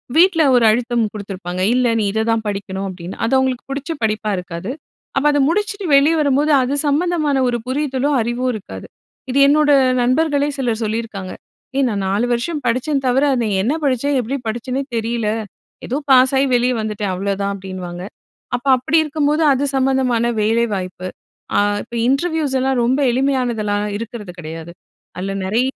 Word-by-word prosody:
வீட்ல 330 -1 +5
ஒரு 240 - +4
அழுத்தம் 235 +1 +1
குடுத்துருப்பாங்க. 185 -3 -5
"இல்ல. 250 -1 +2
நீ - - +1
இதை 220 - 0
தான் 225 -1 +1
படிக்கணும்." 195 -1 -4
அப்படின்னு. 180 0 -8
அது 230 - 0
அவங்களுக்கு 260 -2 0
பிடிச்ச 280 +3 -4
படிப்பா 215 0 0
இருக்காது. 180 +4 -5 0.4
அப்போ 275 +2 +2
அத 290 - +1
முடிச்சுட்டு 410 +2 -1
வெளியே 290 +4 +5
வரும்போது, 290 +1 +2
அது 255 +3 -1
சம்மந்தமான 305 -2 +1
ஒரு 240 -1 0
புரிதலோ, 270 0 -1
அறிவோ 240 +3 -2
இருக்காது. 95 - -8 0.4
இது 275 - +2
என்னோட 295 +1 +4 0.3
நண்பர்களே 285 +3 +2
சிலர் 240 -4 -1
சொல்லியிருக்காங்க. 215 -4 -4 0.4
"ஏய்! 275 0 +3
நான் 200 -3 -2
4 200 +5 +1
வருஷம் 290 +6 -2
படிச்சேன் 270 +4 0
தவிர, 260 +3 +3
அதில 235 -4 0
என்ன 255 +8 +1
படிச்சேன்? 275 +1 +1
எப்படி 260 +4 -3
படிச்சேனே 250 +4 -2
தெரியல. 230 0 -1 0.6
ஏதோ 260 - -1
பாஸாயி 265 +1 +5
வெளிய 250 +1 +2
வந்துட்டேன். 210 -2 -3
அவ்ளோதான்." 200 +1 -2
அப்படின்னுவாங்க. 185 -2 -7 0.5
அப்போ 260 +3 -9
அப்படி 260 +6 +1
இருக்கும்போது, 300 +1 0
அது 270 +1 -1
சம்மந்தமான 260 -3 +1
வேலை 225 +2 +2
வாய்ப்பு 185 -1 -5 0.5
அ - - +5 0.2
இப்போ 235 - -10
இன்டர்வியூஸ் 300 -1 0
எல்லாம் 265 -1 +1
ரொம்ப 255 +4 +1
எளிமையானதெல்லாம் 240 -6 0
இருக்கிறது 220 -3 -7
கிடையாது. 165 +1 -7 0.5
அதில 195 +2 -3
நிறைய 215 +6 +1
245 Hz, 155 wpm, -19 LUFS, 210-275 Hz, 0.6 s, வீட்ல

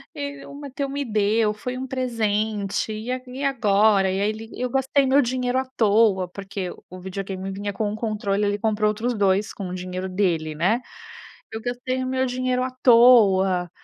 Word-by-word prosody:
e 285 -1 -6
o 280 - -10
Matteo 280 -1 -5
me 280 0 -3
deu, 215 0 +1
foi 250 +4 -5
um 260 - -4
presente, 220 -5 -1
e 215 +2 -6 0.2
e 260 +3 -6
agora?". 210 -7 +3
E 190 - -1
aí 205 +1 +1
ele: 220 +1 -6
"Eu 250 - 0
gastei 270 +1 +2
meu 275 +2 +4
dinheiro 250 +1 0
à 265 - -2
toa", 205 -4 +3
porque 195 0 -6 0.2
o 185 0 -9
videogame 190 +1 -5
vinha 205 +1 -4
com 210 +1 -2
1 - - -4
controle, 210 -2 -1
ele 205 0 0
comprou 215 0 +1
outros 230 +4 -1
2 200 -1 +1
com 195 -3 -6
o 180 - -5
dinheiro 185 +1 -5
dele, 170 -5 0
né. 195 +10 +1 0.7
"Eu 220 - -5
gastei 250 +2 -3
o 255 - -2
meu 260 0 0
dinheiro 255 0 -1
à 255 - -2
toa". 195 -7 +5
215 Hz, 185 wpm, -23 LUFS, 195-250 Hz, 0.7 s, toa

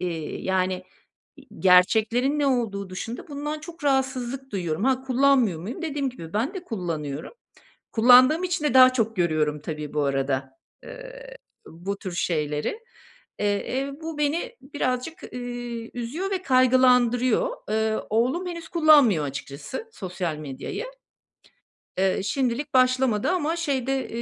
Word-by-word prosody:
Eee, 165 -4 -4
yani, 185 -1 0 0.8
gerçeklerin 220 +9 +4
ne 285 - +2
olduğu 215 -7 -1
dışında 225 +6 -6
bundan 295 +1 -4
çok 330 +1 -11
rahatsızlık 265 -1 -1
duyuyorum. 175 -2 -2
Ha, 260 -1 +2
kullanmıyor 260 -8 +3
muyum? 235 - -6
Dediğim 285 -4 -1
gibi, 165 -10 -10
ben 225 - 0
de 380 -3 -6
kullanıyorum. 160 - -4 0.6
Kullandığım 255 +8 +6
için 355 -3 -2
de 280 -4 +1
daha 255 0 +8
çok 225 -3 -1
görüyorum 155 -4 +1
tabii 150 -1 -6
bu 150 - +1
arada, 135 -1 -1 0.3
eee, - - -10 0.3
bu 195 +5 -6
tür 185 -4 -6
şeyleri. 150 - -1 0.6
Eee, 210 - +1 0.3
eee, 275 +1 -3
bu 320 -2 -6
beni 335 +12 -1
birazcık, 275 +3 -3
ııı, 245 -2 -5
üzüyor 280 +12 -4
ve 375 -1 -2
kaygılandırıyor. 255 - +3 0.2
Eee, 220 0 +1
oğlum 255 +11 +1
henüz 335 -1 -7
kullanmıyor 290 - +5
açıkçası, 140 - -6
sosyal 180 - -4
medyayı. 150 - -6 1.1
Iıı, 190 0 +1
şimdilik 260 +4 -1
başlamadı 255 - +3
ama 335 -2 0
şeyde, 270 -5 -1
245 Hz, 130 wpm, -25 LUFS, 185-285 Hz, 1.1 s, daha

